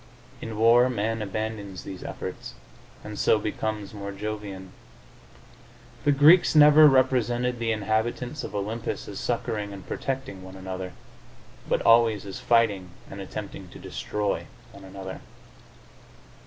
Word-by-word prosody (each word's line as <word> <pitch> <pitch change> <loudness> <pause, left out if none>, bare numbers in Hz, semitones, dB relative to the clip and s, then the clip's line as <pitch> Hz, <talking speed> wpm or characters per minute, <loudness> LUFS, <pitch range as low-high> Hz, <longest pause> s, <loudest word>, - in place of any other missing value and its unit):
In 110 -2 -6
war 120 +3 +5
man 115 -1 -1
abandons 105 -2 -4
these 95 -2 -8
efforts, - - -7 0.5
and 105 -1 -7
so - - +4
becomes 105 -1 -3
more 100 -1 -6
jovian. 100 -2 -6 1.3
The 145 - +5
Greeks 155 +5 +6
never 150 0 +9
represented 125 -2 +2
the 115 -1 0
inhabitants 110 +6 -1
of - - -6
Olympus 105 +3 -3
as - - -6
succoring 105 -2 -2
and 95 -2 -10
protecting 135 -8 -4
one 95 0 -11
another, 95 -1 -6 0.8
but - - +1
always 115 -3 +4
as 95 -2 -7
fighting 105 -6 +2 0.2
and - - -7
attempting - - -7
to - - -12
destroy 105 -1 -3 0.2
one 100 -1 -13
another. 95 0 -8
110 Hz, 130 wpm, -26 LUFS, 100-120 Hz, 1.3 s, never